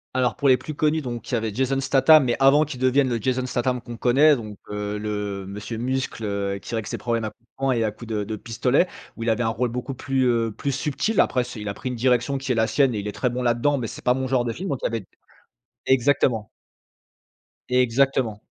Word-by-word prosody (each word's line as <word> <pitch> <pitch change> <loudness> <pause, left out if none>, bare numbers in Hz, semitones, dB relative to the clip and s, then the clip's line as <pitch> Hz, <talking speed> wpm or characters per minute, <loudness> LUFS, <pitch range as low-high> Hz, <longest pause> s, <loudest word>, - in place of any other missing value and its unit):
Alors, 125 -2 +1
pour 140 - 0
les 130 - +6
plus 140 +5 -7
connus 155 +1 +1
donc 120 -2 -6
il 125 - 0
y - - +2
avait 110 -2 -3
Jason 135 +3 0
Statham 135 +3 +5
mais, 120 -2 +1
avant 140 +3 +5
qu'il 135 -4 -7
devienne 130 +1 +3
le 120 -1 -1
Jason 130 +2 0
Statham 125 0 -1
qu'on 120 0 -9
connaît. 135 +6 +5
Donc, 105 -5 -7
heu, 105 0 -3
le 105 -2 -4
Monsieur 105 +3 -6
Muscle, 130 -1 -2
heu, 100 -1 -2
qui - - -9
règle 110 -2 -2
ses - - -4
problèmes 115 -2 -1
à - - -2
coups 115 +2 -27
de - - -75
poing 135 0 +1
et 115 -2 +1
à 110 - 0
coups 110 +2 -12
de 105 -1 -1
de 110 +2 -4
pistolet 125 - +1 0.3
où 115 - -5
il 115 - 0
avait 110 +2 +1
un 115 - +1
rôle 120 +2 -1
beaucoup 125 +3 -4
plus, 135 0 -1
heu, 115 -2 +1
plus 140 +7 -3
subtil. 150 - -1
Après 125 -2 +1
c'est 120 -3 -8
il 105 - -4
a 100 - -4
pris 130 - -5
une 125 - -3
direction 125 +2 +1
qui 135 0 -3
est - - +2
la 110 -1 +3
sienne 130 +1 +2
et - - -1
il 100 - -5
est - - -2
très 125 - -1
bon 125 +1 -3
là-dedans 120 +4 +2
mais 125 - -3
c'est - - -8
pas 125 - +3
mon 130 0 -2
genre 125 -2 +1
de 115 - -1
film 190 +7 -5
donc 135 - -2
il - - -3
y - - +4
avait 115 -1 -3
d - - -18 0.8
exactement. 125 -4 +2 1.2
Exactement. 125 -3 +2
125 Hz, 260 wpm, -24 LUFS, 110-130 Hz, 1.2 s, les